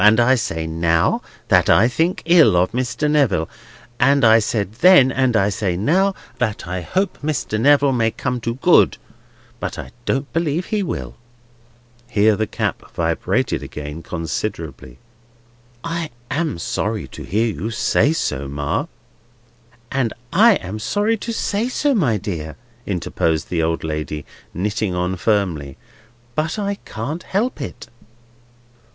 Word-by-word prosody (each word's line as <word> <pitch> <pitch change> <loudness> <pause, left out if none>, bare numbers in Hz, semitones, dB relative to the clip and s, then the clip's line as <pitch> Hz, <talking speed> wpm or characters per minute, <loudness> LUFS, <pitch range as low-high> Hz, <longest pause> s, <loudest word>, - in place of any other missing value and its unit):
And 105 +2 +6
I 120 +2 +5
say 80 -10 -1
now, 80 0 +1 0.3
that - - +4
I 115 - +6
think 165 +8 0
ill 165 - +6
of 90 +1 +2
Mr. 130 +5 -1
Neville. 135 - +2 0.5
And 135 0 +4
I 110 0 +7
said 105 -2 -1
then, 180 -8 +7
and 130 -3 +2
I 100 0 +3
say 95 -3 -1
now, 190 - +2 0.2
that 110 -7 -1
I 90 0 -3
hope 190 - -1
Mr. 145 -8 -1
Neville 145 +1 +5
may 115 -3 +2
come 125 +1 -3
to 115 +1 -2
good, 170 +7 +4 0.6
but - - -4
I - - -7
don't 135 +1 -1
believe 165 +1 0
he 215 -1 -1
will." 185 - -4 0.9
Here 105 +1 +3
the 110 +1 -1
cap - - -2
vibrated - - 0
again 75 +2 -7
considerably. 80 -7 -5 0.9
"I 165 -1 -3 0.2
am 155 - -1
sorry 85 - -2
to - - -10
hear 110 +3 0
you 95 +8 -4
say 115 +5 +2
so, 70 - -2
Ma—" 70 +1 -2 1.1
"I 135 - +3
am 95 - -5
sorry 205 - 0
to 230 +3 -5
say 225 +1 -1
so, 285 +2 +1
my 145 - +2
dear," 80 -6 -5 0.3
interposed 80 -4 -1
the 85 -2 +1
old 80 0 -1
lady, 75 -1 -4 0.3
knitting 105 +1 -2
on 90 +1 -1
firmly, 90 -9 -1 0.6
"but 155 - -1
I 200 -1 -2
can't 140 +10 -5
help 210 - -2
it." - - -6
115 Hz, 145 wpm, -20 LUFS, -, 1.1 s, I